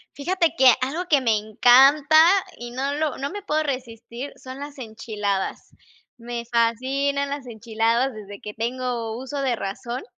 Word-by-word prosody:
Fíjate 340 Hz, +3 st, 0 dB
que 265 Hz, -5 st, +7 dB
algo 300 Hz, +8 st, -2 dB
que 285 Hz, -3 st, +4 dB
me 230 Hz, -4 st, +2 dB
encanta, 270 Hz, +8 st, +6 dB, 0.3 s
y 240 Hz, 0 st, -7 dB
no 270 Hz, +3 st, -2 dB
lo 300 Hz, -1 st, -2 dB
no 280 Hz, +1 st, -4 dB
me 410 Hz, +2 st, -6 dB
puedo 310 Hz, -5 st, 0 dB
resistir 250 Hz, -1 st, -6 dB
son 260 Hz, +1 st, -10 dB
las 285 Hz, +1 st, -8 dB
enchiladas. 215 Hz, -4 st, -4 dB, 0.4 s
Me 235 Hz, 0 st, -6 dB
fascinan 265 Hz, +5 st, 0 dB
las 280 Hz, -2 st, -5 dB
enchiladas 230 Hz, +3 st, 0 dB
desde 205 Hz, -2 st, -10 dB
que 210 Hz, -, -8 dB
tengo 235 Hz, -1 st, -3 dB
uso 265 Hz, +3 st, -5 dB
de 260 Hz, -3 st, 0 dB
razón. 235 Hz, +5 st, -5 dB
255 Hz, 155 wpm, -23 LUFS, 230-280 Hz, 0.4 s, que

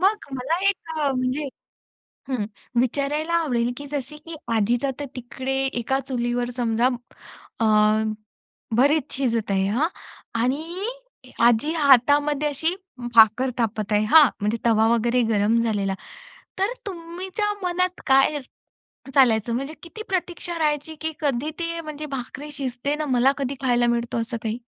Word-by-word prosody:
मग 405 Hz, +3 st, +3 dB
मला 270 Hz, +6 st, -1 dB
एक 325 Hz, -5 st, -3 dB
अ, 285 Hz, -2 st, +2 dB
म्हणजे 255 Hz, +3 st, -1 dB, 0.8 s
हं 250 Hz, -6 st, -1 dB, 0.4 s
विचारायला 285 Hz, +5 st, -1 dB
आवडेल, 245 Hz, -8 st, +1 dB
की 285 Hz, +1 st, -8 dB
जसे 290 Hz, 0 st, -4 dB
की 325 Hz, +2 st, -9 dB, 0.2 s
आजीचा 240 Hz, +5 st, +1 dB
तर 290 Hz, -, -2 dB
तिकडे 260 Hz, +2 st, -4 dB
एका 265 Hz, +1 st, -1 dB
चुलीवर 240 Hz, -1 st, -1 dB
समजा 235 Hz, 0 st, +1 dB, 0.7 s
अ, -, -, +3 dB, 1.1 s
भरीत 285 Hz, +3 st, +3 dB
शिजत 235 Hz, -6 st, -1 dB
आहे 195 Hz, -1 st, +2 dB
हां 265 Hz, +10 st, +1 dB, 0.5 s
आणि 325 Hz, -, -2 dB, 0.6 s
आजी 240 Hz, +5 st, +4 dB
हातामध्ये 290 Hz, +1 st, +4 dB
अशी 320 Hz, +5 st, 0 dB, 0.4 s
भाकर 225 Hz, +3 st, +6 dB
थापत 215 Hz, -2 st, -1 dB
आहे 210 Hz, +1 st, +3 dB
हां, 305 Hz, +3 st, +8 dB
म्हणजे 210 Hz, +3 st, 0 dB
तवा 225 Hz, -1 st, +4 dB
वगैरे 240 Hz, +2 st, +2 dB
गरम 215 Hz, +2 st, +3 dB
झालेला. 200 Hz, -4 st, 0 dB, 0.6 s
तर 390 Hz, +5 st, +1 dB
तुमच्या 370 Hz, +4 st, -3 dB
मनात 365 Hz, 0 st, 0 dB
काय 270 Hz, +2 st, +4 dB, 0.7 s
चालायचं, 230 Hz, -4 st, +4 dB
म्हणजे 275 Hz, +5 st, -3 dB
किती 350 Hz, +6 st, -8 dB
प्रतीक्षा 350 Hz, -2 st, -3 dB
राहायची, 300 Hz, 0 st, 0 dB
की 320 Hz, 0 st, -2 dB
कधी 285 Hz, -1 st, 0 dB
ते, 335 Hz, -1 st, -3 dB
म्हणजे 305 Hz, -1 st, -6 dB
भाकरी 270 Hz, +4 st, -7 dB
शिजते? 270 Hz, 0 st, -2 dB
ना, 305 Hz, -, -2 dB
मला 255 Hz, +1 st, +4 dB
कधी 275 Hz, 0 st, -2 dB
खायला 240 Hz, -2 st, +3 dB
मिळतो, 235 Hz, 0 st, 0 dB
असं 230 Hz, +1 st, -4 dB
काही? 225 Hz, +1 st, -2 dB
270 Hz, 140 wpm, -24 LUFS, 235-310 Hz, 1.1 s, हां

